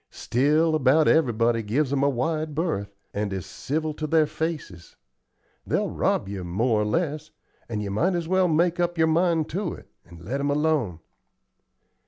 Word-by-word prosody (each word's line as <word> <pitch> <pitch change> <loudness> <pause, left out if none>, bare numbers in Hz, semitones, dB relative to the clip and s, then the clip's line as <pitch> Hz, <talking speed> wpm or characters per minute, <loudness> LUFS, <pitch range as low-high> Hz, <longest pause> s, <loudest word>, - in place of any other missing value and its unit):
Still 150 +6 +1
about 155 +1 +4
everybody 120 -6 +3
gives 130 +7 0
'em 140 - +1
a 140 - +3
wide 155 +4 -2
berth, 100 - -2 0.2
and 105 0 -2
is 95 -2 -4
civil 155 +2 -3
to 155 +1 -4
their 160 0 +4
faces. 150 - -5 0.7
They'll - - -1
rob - - 0
you 100 -2 -5
more 105 +6 +1
or - - 0
less, 155 +4 -1 0.4
and 105 -2 -3
you 100 - -4
might 170 - +1
as 170 -2 -2
well 185 +1 +3
make 170 +2 +2
up 175 0 0
your 160 - +4
mind 165 -1 +2
to 180 +1 -3
it, - - -16
and 85 -1 -14
let 130 +8 -2
'em 140 +1 0
alone." 145 - 0
150 Hz, 175 wpm, -25 LUFS, 110-160 Hz, 0.7 s, about